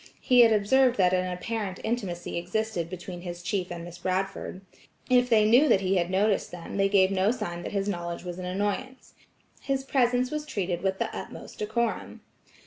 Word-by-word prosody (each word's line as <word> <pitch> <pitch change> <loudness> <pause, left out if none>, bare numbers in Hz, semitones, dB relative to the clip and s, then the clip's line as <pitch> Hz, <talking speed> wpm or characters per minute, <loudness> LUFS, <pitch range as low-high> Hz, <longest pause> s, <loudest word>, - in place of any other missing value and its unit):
He 250 -2 +3
had 230 -2 +8
observed 245 +5 +3
that 185 -2 +4
an 185 0 +1
apparent 195 +1 -4
intimacy 200 -7 -3
existed 180 0 -2
between 180 0 -7
his 175 -1 -7
chief 185 -3 -2
and 170 -1 -5
Miss 175 0 -10
Bradford. 185 +1 -3 0.5
If 250 0 +4
they 215 -2 +5
knew 255 +7 +6
that 200 - +4
he 190 0 +1
had 175 0 0
noticed 195 +2 +1
them 175 +2 -7
they 195 0 +3
gave 195 -1 +4
no 190 +1 +2
sign 175 -7 -3
that - - -6
his 200 -1 -1
knowledge 175 -3 -3
was 180 0 -6
an 180 - -5
annoyance. 205 +8 -3 0.5
His 270 -1 -1
presence 250 -2 +1
was 305 0 -2
treated 185 - -3
with 190 0 0
the - - -3
utmost - - -8
decorum. 220 +2 -2
195 Hz, 190 wpm, -27 LUFS, 180-230 Hz, 0.5 s, had